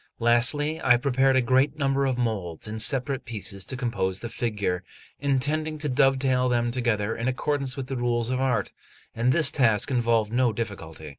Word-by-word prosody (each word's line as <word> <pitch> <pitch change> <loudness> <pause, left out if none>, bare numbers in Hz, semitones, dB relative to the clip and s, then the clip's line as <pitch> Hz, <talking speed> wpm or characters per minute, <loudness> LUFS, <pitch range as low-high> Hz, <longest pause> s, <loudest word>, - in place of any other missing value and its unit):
Lastly, 145 +7 +2
I 125 -1 +5
prepared 135 +1 +2
a 130 - +3
great 130 +4 +2
number 135 -1 +1
of 130 -2 -1
moulds 105 -8 -3
in 110 +1 -5
separate 135 +3 +1
pieces 105 -5 -6
to 130 - -5
compose 115 -7 -2
the 120 - -5
figure, 100 -7 -2 0.4
intending 145 +3 0
to 150 0 -3
dovetail 130 -1 +2
them 120 -1 0
together 115 -4 -1
in 115 - -3
accordance 135 0 -1
with 135 - -4
the 135 0 -5
rules 120 0 -1
of 130 0 -1
art; 130 -2 0 0.4
and 120 +2 +1
this 155 +2 +4
task 115 -2 +2
involved 115 -3 +1
no 125 -2 +2
difficulty. 85 -8 -6
125 Hz, 175 wpm, -25 LUFS, 115-135 Hz, 0.4 s, I